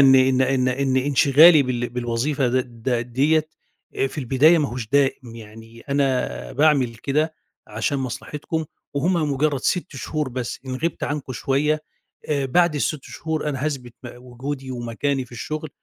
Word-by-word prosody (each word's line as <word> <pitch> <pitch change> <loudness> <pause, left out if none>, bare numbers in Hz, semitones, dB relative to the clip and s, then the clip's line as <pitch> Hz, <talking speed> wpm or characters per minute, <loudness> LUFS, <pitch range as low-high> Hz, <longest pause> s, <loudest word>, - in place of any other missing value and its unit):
إن 135 -1 +7
إن 130 0 +4
إن 130 -1 +2
إن 130 +1 0
إنشغالي 145 +3 +6
بال 120 -2 -2
بالوظيفة 125 +3 -1
د 120 -2 -2
د 130 - -1 0.2
ديّة، 155 +4 +2 0.6
في 150 - -9
البداية 145 +6 +4
ما 145 -3 0
هوش 120 -2 -5
دائم، 135 -3 +1
يعني 115 +1 -12
أنا 130 - -1
باعمل 140 -5 +3
كده 150 +6 -1 0.3
عشان 110 +6 -2
مصلحتكم، 150 +5 -4 0.3
وهُم 155 0 +1
مجرد 140 0 0
6 180 -4 -1
شهور 150 +2 -3
بس، 125 -1 -4
إن 130 - -3
غِبت 165 +5 -2
عنكم 145 -2 -4
شوية، 150 +5 0 0.5
آآ، 140 -3 0
بعد 170 +4 +3
ال6 145 0 -1
شهور 160 -2 -3
أنا 135 -1 -3
هاثبِت 125 -5 -5
م - - -5
وجودي 130 +2 -6
ومكاني 125 +3 -2
في 125 - -19
الشغل، 155 +6 -5
135 Hz, 155 wpm, -22 LUFS, 125-150 Hz, 0.6 s, إن